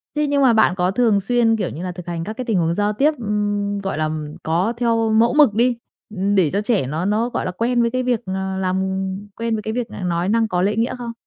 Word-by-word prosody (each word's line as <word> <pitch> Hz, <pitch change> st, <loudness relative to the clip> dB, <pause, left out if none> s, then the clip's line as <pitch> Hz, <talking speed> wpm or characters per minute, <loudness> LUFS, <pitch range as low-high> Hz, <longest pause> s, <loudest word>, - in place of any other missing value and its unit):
thế 300 Hz, 0 st, +1 dB
nhưng 285 Hz, 0 st, +1 dB
mà 250 Hz, -3 st, +5 dB
bạn 220 Hz, -5 st, +3 dB
có 180 Hz, 0 st, +1 dB
thường 220 Hz, -2 st, +2 dB
xuyên, 225 Hz, +2 st, +2 dB
kiểu 195 Hz, -, -2 dB
như 165 Hz, +5 st, -7 dB
là, 180 Hz, -, -3 dB
thực 175 Hz, 0 st, -10 dB
hành 170 Hz, -1 st, -3 dB
các 215 Hz, -, -5 dB
cái 255 Hz, -, -4 dB
tình 220 Hz, -6 st, 0 dB
huống 165 Hz, 0 st, +1 dB
giao 205 Hz, +2 st, 0 dB
tiếp, 290 Hz, +7 st, +2 dB
ừm, 205 Hz, -1 st, -1 dB
gọi 195 Hz, -5 st, -3 dB
là, 155 Hz, 0 st, 0 dB, 0.3 s
có 175 Hz, +8 st, 0 dB
theo 230 Hz, -2 st, +1 dB
mẫu 225 Hz, +2 st, +3 dB
mực 295 Hz, -8 st, +5 dB
đi, 240 Hz, +2 st, +2 dB, 0.6 s
để 175 Hz, -6 st, +3 dB
cho 200 Hz, -, 0 dB
trẻ 210 Hz, -, 0 dB
nó 160 Hz, +6 st, -2 dB
nó 220 Hz, +4 st, +1 dB
gọi -, -, -3 dB
là 185 Hz, -, -2 dB
quen 235 Hz, +5 st, 0 dB
với 235 Hz, 0 st, +1 dB
cái 255 Hz, 0 st, -1 dB
việc, 245 Hz, -2 st, 0 dB
ờ, 190 Hz, 0 st, -3 dB
làm 190 Hz, 0 st, 0 dB, 0.5 s
quen 230 Hz, -1 st, -1 dB
với 215 Hz, -, -3 dB
cái 220 Hz, +1 st, -4 dB
việc 245 Hz, -1 st, -3 dB
là -, -, -8 dB
nói 175 Hz, +1 st, -1 dB
năng 225 Hz, 0 st, +2 dB
có 180 Hz, -4 st, -1 dB
lễ 205 Hz, +2 st, +1 dB
nghĩa 230 Hz, +3 st, 0 dB
không? 235 Hz, -1 st, -6 dB
210 Hz, 265 wpm, -20 LUFS, 185-235 Hz, 0.6 s, mà